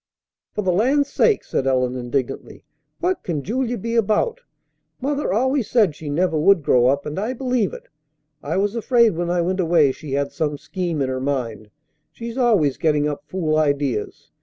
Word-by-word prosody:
"For 210 - -1
the 185 - +2
land's 265 +10 +2
sake!" 450 -3 +3
said 135 - -2
Ellen 125 -1 +1
indignantly. 130 +1 -4 0.4
"What 365 +1 0
can 155 -5 -3
Julia 245 - -1
be 230 +3 -4
about? 235 - +1 0.6
Mother 285 -3 -1
always 260 +3 +1
said 215 -10 +3
she 155 -1 -7
never 160 +1 +1
would 180 0 +4
grow 125 -2 +4
up, 140 +2 +1
and 150 +4 -4
I 220 +5 -2
believe 250 -5 0
it. - - -10 0.5
I 160 +5 -2
was 205 +3 0
afraid 235 -1 +3
when 175 +1 -2
I 175 0 +1
went 185 +2 -1
away 165 -5 +4
she 140 +1 -8
had 140 0 -1
some 150 -2 -2
scheme 165 0 -3
in 130 - -2
her 130 0 -3
mind. 120 -6 -3 0.4
She's 235 0 -7
always 210 - +2
getting 150 -2 +1
up 145 -1 -5
fool 155 -4 0
ideas. 140 -7 -1
175 Hz, 185 wpm, -21 LUFS, 140-230 Hz, 0.6 s, would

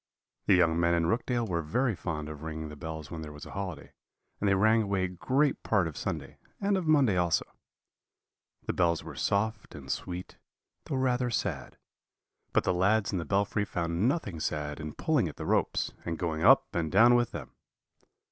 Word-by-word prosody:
"The 95 - +6
young 85 -2 +3
men 85 0 +3
in 85 -1 +1
Rookdale 120 +5 0
were 85 -3 -1
very 115 - 0
fond 75 -4 -4
of 75 -1 -8
ringing 80 -1 -5
the 75 - -9
bells 80 -1 -7
when 80 -2 -5
there 75 -1 -7
was 75 0 -10
a - - -10
holiday, 90 -6 -6 0.5
and 100 - +1
they 95 - +4
rang 110 +3 +4
away 100 -3 0
great 130 - 0
part 100 -6 +2
of 80 - -7
Sunday - - -5 0.2
and 200 0 +1
of 185 -4 -1
Monday 135 -11 +4
also. 85 -1 +2 1.2
"The - - -1
bells 85 -2 +1
were - - -8
soft 110 +1 -1
and 70 -3 -6
sweet, 90 0 -5 0.5
though - - -3
rather 125 -1 +1
sad; 115 - -3 0.7
but - - +2
the 95 - +1
lads 100 +4 +2
in 95 - -1
the 85 - -4
belfry 100 +1 +1
found 85 +1 -1
nothing 105 - -2
sad 75 -1 -3
in 75 -1 -6
pulling 150 - +1
at 75 - -7
the - - -6
ropes, - - 0
and 85 -1 -3
going 80 -2 -2
up - - +7
and 80 -3 -1
down 115 +5 +7
with 120 -1 +3
them. - - -7
90 Hz, 195 wpm, -29 LUFS, 80-110 Hz, 1.2 s, up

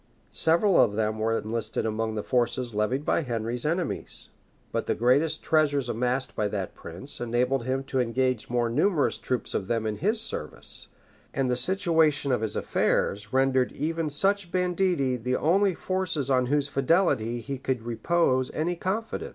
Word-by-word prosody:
Several 170 +4 +3
of 105 - +3
them 110 0 -1
were 115 +1 +1
enlisted 110 0 -2
among 110 0 -2
the 105 - -3
forces 125 -1 0
levied 125 +7 0
by - - +2
Henry's 120 -1 -2
enemies; 170 +2 -3 0.4
but - - -2
the - - +1
great 125 +4 +4 0.2
treasures 145 -5 +2
amassed 125 +3 -1
by 105 - 0
that 100 -2 -4
prince 95 +14 -6
enabled 120 +1 0
him 130 +1 -1
to 135 -1 -2
engage 125 0 0
more 120 -1 +1
numerous 150 - +1
troops 125 -2 -2
of 95 - -2
them 115 -1 -1
in 105 -1 -2
his 215 +7 +1
service; 75 - -4 0.5
and 135 -2 +1
the 125 - +2
situation 160 -1 +2
of 125 - +1
his 110 -2 -2
affairs 105 +2 0
rendered 130 -1 +2
even 160 +1 -2
such 195 +4 0
banditti 180 -7 +1
the 125 +2 -1
only 190 +6 +2
forces 165 -8 -2
on 125 -1 +3
whose 145 +1 +1
fidelity 135 - +1
he 135 +2 -5
could 130 -3 -2
repose 130 +3 +1
any 170 +3 0
confidence. 205 +6 -3
130 Hz, 165 wpm, -27 LUFS, 115-160 Hz, 0.5 s, great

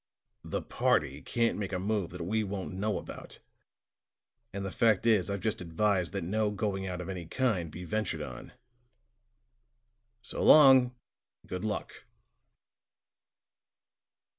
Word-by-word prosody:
The - - -3
party 70 +3 0
can't 115 - 0
make 100 -2 -3
a 95 - -1
move 100 -1 -1
that 90 -1 -6
we 110 +4 0
won't 100 -2 -5
know 100 +2 -1
about; - - -9 1.1
and 100 0 -4
the 95 - -4
fact 110 -1 +2
is, 110 -5 +3
I've 100 -1 -3
just 110 -4 -2
advised 90 +1 0
that 100 - -2
no 105 +4 0
going 100 -2 -2
out 90 -1 -4
of 90 - -7
any 90 -3 -5
kind 100 -8 0
be 85 +4 -8
ventured 105 +1 -2
on. - - -9 1.7
So - - -5
long, 130 -4 +7 0.5
and - - -22
good 90 +1 -4
luck." 110 -1 -4
100 Hz, 140 wpm, -30 LUFS, 90-110 Hz, 1.7 s, long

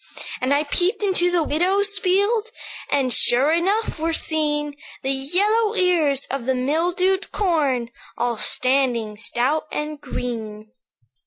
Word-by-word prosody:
"And 255 +2 0
I 285 +1 +3
peeped 365 +8 0
into 370 -3 +2
the 350 -2 +1
widow's 390 +7 +1
field, 405 +4 +1 0.4
And, 260 -3 +1
sure 260 +5 +3
enough, 380 +4 0
were 325 +1 -1
seen 295 -2 0 0.3
The 265 - 0
yellow 410 +11 +1
ears 320 -8 +2
of 265 -2 -4
the 260 - +2
mildewed 350 +8 0
corn, 285 - 0 0.3
All 240 0 0
standing 250 -4 +1
stout 250 +9 -1
and 300 0 -4
green. 220 -5 -6
300 Hz, 130 wpm, -22 LUFS, 260-365 Hz, 0.4 s, I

